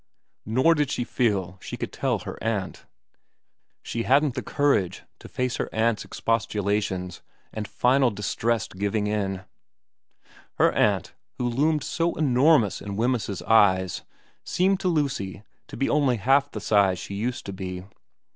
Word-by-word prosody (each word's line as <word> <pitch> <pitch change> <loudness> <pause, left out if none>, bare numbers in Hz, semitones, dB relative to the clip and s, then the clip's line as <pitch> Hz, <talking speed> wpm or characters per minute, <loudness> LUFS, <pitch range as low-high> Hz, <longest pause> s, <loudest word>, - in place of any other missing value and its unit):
Nor 130 +9 +4
did 150 -4 0
she 125 - -1
feel 95 -8 -1
she - - -6
could - - -5
tell - - 0
her - - -8
aunt. 105 -4 -3 1.0
She 115 - -3
hadn't 140 +3 +3
the - - -3
courage 140 - 0 0.2
to - - -11
face 125 -1 -2
her - - -2
aunt's 110 0 +1
expostulations 105 -5 -2 0.3
and 105 -1 -4
final 130 +1 +3
distressed 105 0 -2
giving 105 +2 0
in. 100 -3 -2 1.1
Her - - +4
aunt, - - +1 0.2
who 125 - -1
loomed 150 +6 +1
so 170 0 -1
enormous 135 - +3
in 100 0 -5
Wemyss's 115 -3 -1
eyes, 95 -4 +3 0.4
seemed 190 +1 +1
to 185 - -1
Lucy 135 - -1 0.2
to - - -9
be 135 - 0
only 140 -5 +2
half 135 +6 +3
the 105 - -7
size 100 -3 +3
she 100 - -7
used 115 +5 -3
to 100 - -5
be. 90 -1 -6
115 Hz, 145 wpm, -25 LUFS, 100-135 Hz, 1.1 s, Nor